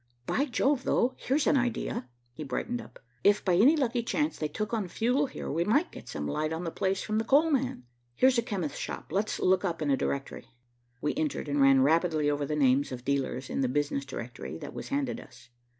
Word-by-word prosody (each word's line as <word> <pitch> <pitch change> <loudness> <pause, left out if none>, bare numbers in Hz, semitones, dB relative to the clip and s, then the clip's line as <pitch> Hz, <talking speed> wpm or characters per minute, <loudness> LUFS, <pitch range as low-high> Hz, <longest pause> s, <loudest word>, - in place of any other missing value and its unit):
By 275 - +1
Jove, 270 0 +1
though, 255 0 +2
here's 280 +3 0
an - - +4
idea." 240 - -2 0.2
He 155 - -7
brightened 240 - -3
up. - - -14 0.3
"If, 205 +1 +4
by 185 - +3
any 235 - +6
lucky 250 -5 0
chance, 295 +6 -1
they 155 - -2
took 215 +9 -4
on 215 -5 0
fuel 250 +9 +1
here, 260 - -6
we 165 +4 +1
might 280 - +2
get - - -11
some - - -4
light 155 +1 -1
on 160 +2 -3
the 165 - -3
place 190 +2 -1
from 215 0 0
the - - 0
coal 295 +7 +4
man. 265 - 0 0.3
Here's 255 - +4
a - - +3
chemist's 190 -10 -3
shop, - - -6
let's 205 +3 -1
look 185 +1 +3
up 170 -3 -1
a 145 -3 +2
directory." 140 +1 -3 0.5
We 150 - 0
entered, 155 -1 -2
and 145 0 +1
ran 135 -1 +6
rapidly 155 0 +2
over 145 -1 -1
the 150 - -1
names 140 -1 +3
of 125 -1 -7
dealers 135 -2 -1
in - - -2
the 130 - +2
business 145 0 0
directory 125 -3 -7
that 145 -3 -8
was - - -6
handed 280 -1 -1
us. 120 -1 -15
180 Hz, 220 wpm, -29 LUFS, -, 0.5 s, any